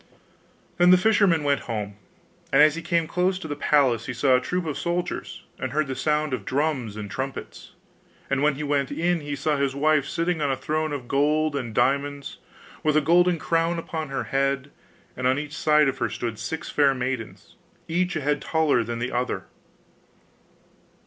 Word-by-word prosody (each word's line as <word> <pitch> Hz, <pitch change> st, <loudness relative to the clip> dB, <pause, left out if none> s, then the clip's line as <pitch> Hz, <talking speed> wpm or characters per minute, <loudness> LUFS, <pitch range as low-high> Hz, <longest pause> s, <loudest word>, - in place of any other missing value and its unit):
Then 175 Hz, 0 st, +6 dB
the 185 Hz, -, +8 dB
fisherman 190 Hz, -5 st, +3 dB
went 140 Hz, -1 st, +2 dB
home; 105 Hz, -3 st, -3 dB, 0.6 s
and 135 Hz, -, +4 dB
as 155 Hz, 0 st, +7 dB
he 165 Hz, -, -5 dB
came 170 Hz, 0 st, +1 dB
close 180 Hz, +3 st, 0 dB
to 185 Hz, -, -7 dB
the 145 Hz, -, -3 dB
palace 135 Hz, -6 st, +2 dB
he 125 Hz, -, -4 dB
saw 130 Hz, +1 st, +3 dB
a 125 Hz, -, +2 dB
troop 180 Hz, +6 st, -2 dB
of 150 Hz, -3 st, -3 dB
soldiers, 175 Hz, +1 st, -3 dB, 0.2 s
and 130 Hz, -, -3 dB
heard 155 Hz, +1 st, +1 dB
the 135 Hz, -1 st, -4 dB
sound 150 Hz, -1 st, 0 dB
of 120 Hz, -6 st, -3 dB
drums 130 Hz, -4 st, -1 dB
and 105 Hz, -1 st, -5 dB
trumpets. 130 Hz, +7 st, -6 dB, 0.5 s
And 140 Hz, 0 st, 0 dB
when 150 Hz, -1 st, +3 dB
he 150 Hz, -, -5 dB
went 140 Hz, -2 st, 0 dB
in 175 Hz, +1 st, 0 dB
he 145 Hz, -1 st, -4 dB
saw 145 Hz, +2 st, 0 dB
his 140 Hz, -1 st, 0 dB
wife 150 Hz, 0 st, +2 dB
sitting 165 Hz, -1 st, -1 dB
on 145 Hz, -, +1 dB
a -, -, +1 dB
throne 155 Hz, +4 st, -2 dB
of 135 Hz, -4 st, -5 dB
gold 150 Hz, +2 st, +1 dB
and 125 Hz, -5 st, -3 dB
diamonds, 140 Hz, +4 st, -1 dB, 0.4 s
with 155 Hz, 0 st, +2 dB
a -, -, +7 dB
golden 175 Hz, +3 st, +3 dB
crown 165 Hz, +1 st, 0 dB
upon 160 Hz, -2 st, -4 dB
her 135 Hz, -, -2 dB
head; 135 Hz, 0 st, -1 dB, 0.4 s
and 125 Hz, 0 st, -1 dB
on 130 Hz, +1 st, +2 dB
each 150 Hz, +1 st, -5 dB
side 150 Hz, -2 st, +4 dB
of 135 Hz, -, -2 dB
her 115 Hz, -2 st, 0 dB
stood 115 Hz, -1 st, -4 dB
six 155 Hz, +9 st, -4 dB
fair 140 Hz, -2 st, +3 dB
maidens, 125 Hz, -3 st, -5 dB, 0.3 s
each 180 Hz, +2 st, 0 dB
a 155 Hz, -, -1 dB
head 145 Hz, +1 st, 0 dB
taller 155 Hz, -7 st, +2 dB
than 115 Hz, +1 st, -4 dB
the 125 Hz, +2 st, -3 dB
other. 125 Hz, 0 st, -2 dB
145 Hz, 195 wpm, -25 LUFS, 130-160 Hz, 0.6 s, the